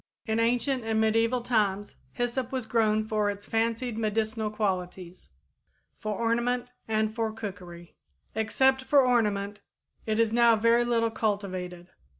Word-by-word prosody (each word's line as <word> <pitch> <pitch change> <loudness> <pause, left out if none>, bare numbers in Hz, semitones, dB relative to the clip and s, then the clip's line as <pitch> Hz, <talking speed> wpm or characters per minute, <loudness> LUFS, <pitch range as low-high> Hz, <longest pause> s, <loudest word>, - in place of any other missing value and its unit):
In 220 0 0
ancient 245 +2 +1
and 225 -1 0
medieval 225 +3 +2
times 205 -4 0 0.2
hyssop 245 0 -2
was 260 -3 -2
grown 215 -1 +2
for 215 -1 0
its 205 0 -6
fancied 230 +1 -1
medicinal 220 0 -1
qualities, 185 -4 -4 0.7
for 215 -2 -3
ornament 240 +2 0 0.2
and 215 -1 0
for 225 -1 -1
cookery. 180 -6 -8 0.4
Except 265 +4 +2
for 275 0 +4
ornament, 210 -4 0 0.5
it 215 0 0
is 225 -1 +2
now 235 -1 +5
very 230 +2 +3
little 230 -1 +1
cultivated. 185 -5 -3
220 Hz, 135 wpm, -27 LUFS, 210-235 Hz, 0.7 s, now